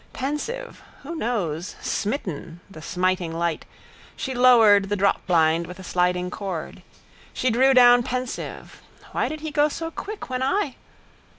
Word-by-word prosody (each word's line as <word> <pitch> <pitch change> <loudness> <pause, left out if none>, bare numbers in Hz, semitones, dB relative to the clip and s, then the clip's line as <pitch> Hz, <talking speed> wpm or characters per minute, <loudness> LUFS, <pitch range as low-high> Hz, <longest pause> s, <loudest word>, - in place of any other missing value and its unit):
Pensive 455 - -4 0.2
(who 310 +5 -6
knows?), 200 - -2
smitten 180 - -3
(the 160 - -11
smiting 180 0 -1
light), 165 -1 -2 0.5
she 265 - -4
lowered 225 -6 +6
the 205 - 0
dropblind 170 -4 +2
with 180 - -9
a 190 - -10
sliding 180 0 0
cord. 185 -6 -5 0.5
She 255 - 0
drew 260 +3 +4
down 245 -1 +7
pensive 255 +1 -5 0.3
(why - - 0
did 310 -1 -6
he 315 -1 -4
go 295 0 +3
so 325 +2 -5
quick 420 +5 -7
when 255 0 -3
I?) 280 0 0
225 Hz, 140 wpm, -24 LUFS, 180-270 Hz, 0.5 s, down